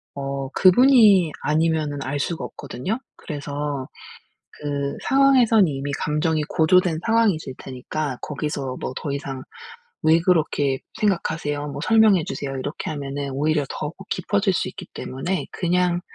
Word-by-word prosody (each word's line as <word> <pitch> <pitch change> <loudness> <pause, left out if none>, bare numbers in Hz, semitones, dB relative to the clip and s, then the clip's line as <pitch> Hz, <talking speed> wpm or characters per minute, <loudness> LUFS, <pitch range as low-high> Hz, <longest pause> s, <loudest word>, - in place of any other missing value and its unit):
어 135 -1 -4
그분이 200 - +6
아니면은 155 -2 +1
알 135 +2 -2
수가 165 +3 -2
없거든요. 140 - -4 0.2
그래서 145 -2 -4 0.7
그 140 -1 -3
상황에서는 255 -7 +5
이미 140 0 -3
감정이 150 +1 0
고조된 165 +2 +3
상황이실 210 - +2
테니까 130 +1 -4
거기서 140 -3 -4
뭐 - - -4
더 140 - -3
이상 135 -2 -5 0.6
"왜 160 +1 +5
그렇게 155 -6 +1 0.2
생각하세요?" 160 -7 -1
뭐 140 0 -6
"설명해 215 -4 +5
주세요." 135 -1 -4
이렇게 145 +4 -4
하면은 140 -1 -4
오히려 150 +2 +1
더욱 - - -5
깊어질 - - +1
수 - - -1
있기 - - -9
때문에 175 +9 -3
그냥 180 0 +1
150 Hz, 310 characters per minute, -23 LUFS, 140-180 Hz, 0.7 s, 그분이